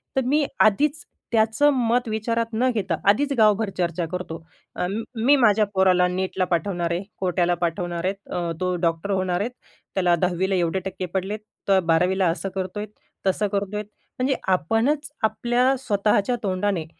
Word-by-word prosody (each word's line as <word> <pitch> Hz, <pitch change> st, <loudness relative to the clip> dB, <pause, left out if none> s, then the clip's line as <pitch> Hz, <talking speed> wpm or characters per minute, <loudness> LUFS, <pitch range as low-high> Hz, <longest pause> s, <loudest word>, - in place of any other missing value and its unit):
तर 265 Hz, -, +3 dB
मी 290 Hz, +3 st, +2 dB
आधीच 285 Hz, +9 st, +3 dB, 0.3 s
त्याचं 225 Hz, +6 st, +3 dB
मत 245 Hz, -1 st, +1 dB
विचारात 230 Hz, +2 st, -1 dB
न 250 Hz, +4 st, +2 dB
घेता, 190 Hz, -6 st, -1 dB
आधीच 285 Hz, +8 st, +3 dB
गावभर 215 Hz, -1 st, +4 dB
चर्चा 175 Hz, -1 st, -1 dB
करतो. 180 Hz, -2 st, -5 dB, 0.3 s
अ, 180 Hz, -, -1 dB, 0.3 s
मी 240 Hz, +6 st, +4 dB
माझ्या 215 Hz, -5 st, +4 dB
पोराला 185 Hz, -2 st, +4 dB
नेटला 185 Hz, +1 st, -1 dB
पाठवणार 175 Hz, -1 st, -1 dB
आहे, 175 Hz, +3 st, -1 dB, 0.2 s
कोट्याला 175 Hz, -1 st, +1 dB
पाठवणार 175 Hz, 0 st, -2 dB
आहे, 190 Hz, -, +1 dB, 0.2 s
अ, 175 Hz, -1 st, -1 dB
तो 180 Hz, 0 st, 0 dB
डॉक्टर 165 Hz, +5 st, -2 dB
होणार 185 Hz, -2 st, 0 dB
आहेत, 230 Hz, +4 st, -2 dB, 0.4 s
त्याला 180 Hz, -2 st, +3 dB
१०वीला 185 Hz, +2 st, 0 dB
एवढे 175 Hz, +1 st, +1 dB
टक्के 190 Hz, -1 st, -4 dB
पडलेत, 195 Hz, +3 st, -2 dB, 0.3 s
तर 195 Hz, -1 st, +5 dB
१२वीला 180 Hz, +3 st, +3 dB
असं 190 Hz, +3 st, -2 dB
करतोय, 190 Hz, +2 st, -3 dB, 0.4 s
तसं 190 Hz, +2 st, +1 dB
करतोय. 200 Hz, +1 st, -2 dB, 0.4 s
म्हणजे 260 Hz, +1 st, +1 dB
आपणच 225 Hz, -, +1 dB
आपल्या 240 Hz, +4 st, +2 dB
स्वतःच्या 210 Hz, -1 st, +1 dB
तोंडाने 185 Hz, -3 st, -1 dB
195 Hz, 150 wpm, -23 LUFS, 180-225 Hz, 0.4 s, तर